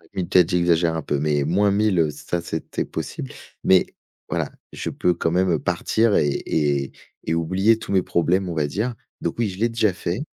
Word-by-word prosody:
oui 90 -2 -1
peut-être 90 -1 +5
j'exagère 85 -2 +2
un 80 - -2
peu, 70 0 -1
mais 75 -1 +1
-1000 100 +2 +2
heu, 80 -2 +3
ça 85 +3 -4
c'est 80 -1 -3
peut - - -3
être - - -4
possible. 65 - -5 0.3
Mais 95 -1 +5 0.4
voilà, - - -2 0.2
je - - -4
peux 90 - +1
quand 80 -1 -1
même 90 -2 +2
partir 110 -1 +1
et 75 - +3 0.2
et 70 -3 0 0.3
et 80 - -1
oublier 95 +7 +2
tous 100 - -5
mes 95 - +4
problèmes, 90 +2 +1
on - - -3
va 75 -2 +1
dire. 110 - -2 0.3
Donc - - -2
oui, 115 - +2
je 90 - -8
l'ai 115 +3 +1
déjà 110 -4 +1
fait. 90 +3 -3
90 Hz, 210 wpm, -23 LUFS, 80-100 Hz, 0.4 s, peut-être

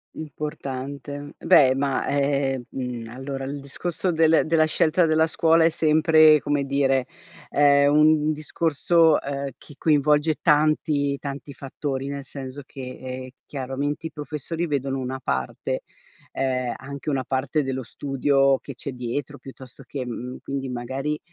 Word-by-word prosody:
Importante. 145 -1 -6
Beh, 130 -2 +6
ma, 135 0 0
ehm, 140 -2 0
mhmm, 125 -3 -5
allora 135 +2 -5
il 140 +1 -5
discorso 175 +6 -3
del 160 -1 +4
della 155 0 +3
scelta 165 +2 +2
della 160 0 +4
scuola 165 0 +3
è 165 - +5
sempre 155 -1 +5
come 145 -1 -1
dire, 135 -2 +1 0.4
è 140 0 +5
un 150 +1 +4
n - - +3
discorso, 160 +1 +2
ehm, 140 0 -4
chi 145 - -15
coinvolge 150 +1 +2
tanti, 150 -2 +2
tanti 140 0 -7
fattori. 135 +1 -4
Nel 140 -1 -5
senso 135 0 -7
che, 135 0 -11 0.2
ehm, 130 0 -6 0.2
chiaramente 140 +3 -3
i - - -11
professori 150 +3 -4
vedono 135 -2 -1
una 130 +1 -4
parte, - - -2 0.5
ehm, 130 -2 -1
anche 140 +2 -6
una 135 -2 0
parte 135 +4 -1
dello 130 -1 -3
studio 135 +2 +1
che 140 - -9
c'è 140 - -5
dietro 125 +3 -5
piuttosto 130 -2 -12
che 135 -3 -6
mhmm, 125 +1 -6
quindi, 135 -1 -4
magari, 130 +5 -3
140 Hz, 145 wpm, -24 LUFS, 135-150 Hz, 0.5 s, Beh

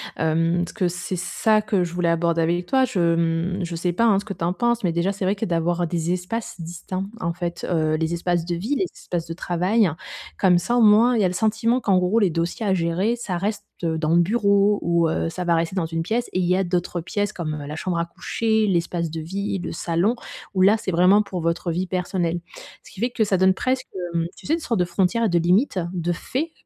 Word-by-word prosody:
hem, 165 +2 +1
ce - - -9
que 185 -5 0
c'est 180 +1 -4
ça 215 +4 +1
que 200 -4 0
je 170 0 -5
voulais 175 -1 0
aborder 170 0 +1
avec 175 +2 0
toi, 265 +3 +3
je, 175 -9 +1
mmh, 170 +3 0
je 170 - -5
sais 175 +2 -1
pas 230 +7 +1
hein, 205 -4 +5
ce 200 - -2
que 215 - -8
tu 170 - -3
en 175 - 0
penses, 240 0 0
mais 170 - +1
déjà, 170 +3 +1
c'est 195 -1 -4
vrai 195 +2 +2
que 205 - -5
d'avoir 175 -1 0
des 170 +1 -1
espaces 185 +6 -4
distincts 185 +3 -5
en 170 -6 -1
fait, 170 0 -4
heu, 155 -3 +1
les 160 +1 -1
espaces 170 -1 0
de 175 -1 -2
vie, 220 +12 -2
les 375 - +1
espaces 170 -2 -4
de 165 - -4
travail. 180 +3 +1 0.5
Comme 180 -2 +5
ça 235 +8 0
au - - +4
moins, 225 +3 +6
il - - +2
y - - +3
a - - +4
le 180 - -3
sentiment 225 +4 +1
qu'en 195 -3 +3
gros, 180 +5 +2
les 200 -4 +3
dossiers 170 +6 -2
à 195 - +2
gérer, 185 +7 0
ça 185 -7 -3
reste 205 +3 -2 0.2
dans 160 0 +1
le 175 - +6
bureau 200 0 +3
ou 170 -1 +2
heu, 165 - -1
ça 180 +2 -4
va 170 -1 +2
rester 165 +3 -1
dans 180 -4 0
une 165 0 -3
pièce, 230 +8 -1
et 185 - -1
il 180 - +1
y 180 +1 +3
a 195 - +1
d'autres 175 -1 -2
pièces 205 +4 -2
comme 155 -3 -4
la 150 - -5
chambre 175 +2 -2
à 170 - 0
coucher, 220 +5 0
l'espace 170 -2 -1
de 165 - -4
vie, 195 +4 -3
le - - -5
salon, 170 +8 0 0.4
où 185 - +1
là, 205 +4 +6
c'est 200 - -3
vraiment 185 +4 +5
pour 190 -3 -5
votre 170 +1 -1
vie 180 +2 -2
personnelle. 175 -2 -1 0.4
Ce - - -15
qui 195 - -10
fait 240 - +2
que 225 -2 0
ça 200 - +1
donne 190 0 +4
presque, 255 +6 -1 0.3
hem, 165 - +1
tu - - -14
sais? 305 - +2
Une - - -4
sorte 235 - -1
de 180 - +3
frontière 190 +6 +1
et - - +2
de 175 - +2
limite, 185 - +2
de 175 -1 -1
fait, 290 - -3
180 Hz, 255 wpm, -23 LUFS, 170-205 Hz, 0.5 s, moins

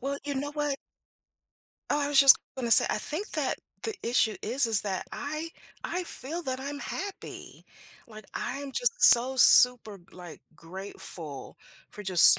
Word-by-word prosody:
Well, 280 +2 -6
you 285 - -6
know 285 +2 -6
what? 295 -2 -4 1.1
Oh, 295 - -1
I 285 0 -3
was 285 -2 +3
just 275 -2 +6 0.2
gonna 245 -3 -5
say, - - +9
I - - -3
think 320 - -2
that - - -4 0.2
the 445 -1 -5
issue 230 -2 -1
is, 250 +4 0
is 220 -2 +2
that 190 -3 -6
I 305 +3 -7 0.4
I 360 +2 -5
feel 330 +2 -4
that 260 -2 -6
I'm 285 +1 -8
happy. 395 +1 -10 0.4
Like, 215 -2 -15
I'm 275 +2 -7
just - - -2
so 250 +3 +7
super, 245 -4 +5
like, 175 -2 -14
grateful 165 -4 -9 0.3
for 210 - -12
just 185 -1 +7
260 Hz, 160 wpm, -25 LUFS, 215-290 Hz, 1.1 s, say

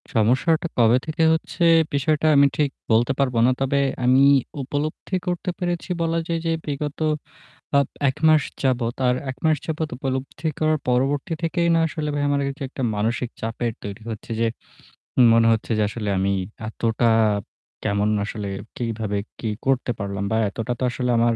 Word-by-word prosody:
সমস্যাটা 130 +10 +2
কবে 120 0 +5
থেকে 155 +1 -1
হচ্ছে, 160 +2 -2 0.3
বিষয়টা 150 +2 +1
আমি 140 0 +7
ঠিক 150 -2 +2 0.2
বলতে 115 +4 +4
পারব 130 -3 +1
না। 130 - +4
তবে 135 +1 +2 0.3
আমি 130 +2 +5 0.4
উপলব্ধি 145 +7 -3
করতে 180 0 -2
পেরেছি 175 0 -2
বলা 165 0 +1
যায় 165 -1 -1
যে, 165 - +1
বিগত 145 0 -4 0.8
আপ 140 - +3 0.2
১ 130 - -1
মাস 155 -1 +5 0.2
যাবত 125 -3 +1
আর 125 - +3 0.2
১ 130 - -8
মাস 155 -1 +4
যাবত 160 -1 -2
উপলব্ধি 135 +4 -3
করার 155 0 +2
পরবর্তী 135 +5 +1
থেকেই 170 +1 +1
না 165 - +3
আসলে 150 -1 -4
ভাই 145 - -1
আমার 140 0 +1
এইযে 140 - -1
এইটা 150 - -9
একটা 135 - -6
মানসিক 115 +3 -1
চাপের 115 +1 -2
তৈরি 100 +2 -7
হচ্ছে 110 +1 -8
যে, 115 - +3 0.9
মনে 115 0 +5
হচ্ছে 115 +1 -1
যে - - +2
আসলে 105 -1 -4
আমি 95 +1 +1 0.4
এতটা 115 +1 0 0.7
কেমন 100 0 +1 0.2
আসলে 105 -1 -5 0.3
কিভাবে 110 -3 -2 0.2
কি 115 - -2 0.2
করতে 135 -2 +1
পারলাম 100 -1 -3
বা 110 - +2
এতটা 115 +4 -3
তো - - -2
আসলে 125 0 -1
আমার 115 0 +3
130 Hz, 170 wpm, -23 LUFS, 115-150 Hz, 0.9 s, আমি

